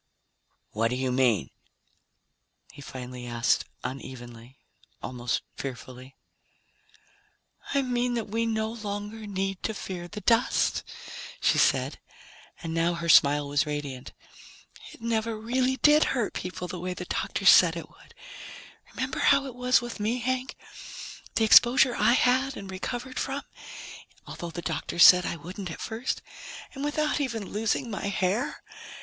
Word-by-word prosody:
"What 115 +2 +1
do 125 - -2
you 130 0 -1
mean?" 125 - +2 1.2
he - - -13
finally 125 -2 -8
asked 120 0 +1 0.2
unevenly, 125 -1 -8 0.4
almost 125 -1 -3
fearfully. 130 0 -8 1.6
"I 280 - +3
mean 245 -1 0
that 230 -3 -2
we 225 +2 -1
no 220 -1 -1
longer 210 0 -6
need 195 -1 -3
to 220 - -2
fear 180 -3 -6
the 210 +4 -8
dust," 230 +2 +2 0.6
she - - +3
said, - - +2 0.6
and 165 -1 -4
now 165 +1 +1
her 170 0 -4
smile 145 -1 +6
was 145 +1 +1
radiant. 145 -4 -5 0.8
"It - - -15
never 225 -1 -1
really 255 +3 0
did 300 +4 +5
hurt 235 -5 -1
people 180 0 -5
the 180 0 -6
way 180 +1 -4
the 180 - -6
doctors 195 +2 +3
said 170 -2 +6
it 160 -2 -7
would. - - -21 0.8
Remember 260 0 -3
how 275 0 +4
it 265 - -7
was 250 0 +3
with 240 -2 -7
me, 220 +4 0
Hank, 255 +2 -2 0.8
the 225 - +2
exposure 245 +3 +6
I 235 - +4
had 260 +2 +2
and 195 -1 -8
recovered 245 +7 -5
from, 275 +1 -3 0.8
although 170 - -7
the 170 +1 -7
doctors 170 - +3
said 180 -1 +8
I - - -2
wouldn't 180 +4 -7
at 160 - -7
first 230 +3 -3 0.5
and 275 - -6
without 300 0 0
even 230 -7 -3
losing 225 +3 -1
my 200 - -4
hair? 200 +2 -1
200 Hz, 145 wpm, -27 LUFS, 150-240 Hz, 1.6 s, said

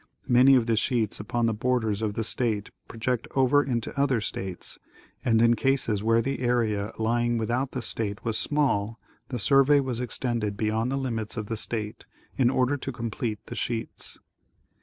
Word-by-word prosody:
Many 130 +2 +6
of 125 -3 +3
the 115 -1 +1
sheets 115 -1 0
upon 115 +3 -1
the 115 - +1
borders 110 -2 0
of 105 -2 -2
the 115 - -1
state 110 -3 -1 0.2
project 120 +1 -2
over 135 +2 +4
into 120 -5 -3
other 140 -3 +2
states, 95 -3 -5 0.4
and, 115 -2 +3
in 115 0 +5
cases 130 -6 +1
where 115 +1 +3
the 135 +1 -2
area 115 -4 0
lying 120 +1 +1
without 120 +4 -1
the 130 - -3
state 105 -1 -1
was 115 -1 +2
small, 115 -7 +1 0.3
the 125 - -3
survey 135 +7 +5
was 130 -4 -2
extended 120 -4 -2
beyond 110 +3 0
the 135 - 0
limits 115 -5 -3
of 105 - -3
the 115 - -3
state, 110 -1 -3 0.3
in 125 -3 +3
order 130 +2 +1
to 135 - -5
complete 115 -2 -4
the - - -7
sheets. 115 -1 -4
115 Hz, 175 wpm, -26 LUFS, 110-125 Hz, 0.4 s, Many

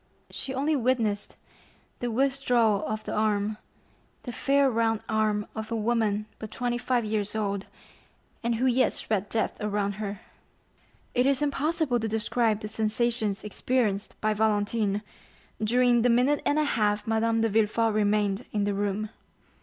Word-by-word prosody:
She 270 - -5
only 285 +4 +1
witnessed 230 -6 0 0.6
the 245 - -2
withdrawal 245 -4 +2
of 215 0 -3
the - - -5
arm—the 210 +3 -4
fair 275 +3 +2
round 225 -3 +1
arm 215 -1 +1
of 220 0 -6
a - - 0
woman 215 -2 0
but 220 - -6
twenty 240 +1 -2
five 245 -2 0
years 210 0 -2
old, 200 -2 -2 0.7
and 235 0 0
who 245 +3 0
yet 255 0 +3
spread 205 -2 -2
death 225 - 0
around 205 -1 0
her. 200 -1 -2 1.0
50077m - - +1
It 250 - +4
is 275 0 +2
impossible 295 -2 +1
to 225 - -2
describe 220 0 +1
the 215 - -4
sensations 220 -1 0
experienced 210 -1 -1
by 215 0 +2
Valentine 210 -1 +1 0.6
during 240 +2 +4
the 245 - +3
minute 250 +5 +3
and 290 - +2
a 305 - +3
half 210 -7 +1
Madame 225 0 +1
de 225 - +2
Villefort 220 +1 +2
remained 210 0 +1
in 210 -1 0
the 205 0 0
room. 205 +1 -2
220 Hz, 155 wpm, -27 LUFS, 210-245 Hz, 1.0 s, It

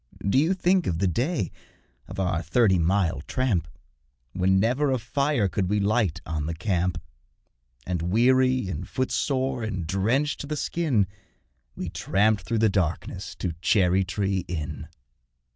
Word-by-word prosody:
Do 115 +7 +4
you 165 +6 +2
think 185 0 +2
of 85 - 0
the 95 - +1
day 120 - 0 0.6
of 95 +2 -7
our 90 -3 0
thirty 95 +2 +3
mile 85 -3 +1
tramp, 115 -11 0 0.7
When 95 +1 +2
never 130 +7 +2
a 130 - +2
fire 125 0 0
could 95 0 -1
we 105 +1 +2
light 105 -3 +1
on 80 -2 -3
the 85 - -3
camp, 90 -1 0 0.9
And, 90 -2 -2
weary 125 +6 +3
and 90 -6 -5
footsore 130 -1 -1
and 100 -6 -3
drenched 115 - 0
to 145 - -6
the 150 0 -3
skin, 145 - +1 0.7
We - - -4
tramped 105 +1 +1
through 115 - -1
the - - +6
darkness 95 -5 -2
to 90 - -3
Cherry 95 -1 +3
tree 95 0 -1
Inn? 80 -2 -5
100 Hz, 150 wpm, -26 LUFS, 90-130 Hz, 0.9 s, the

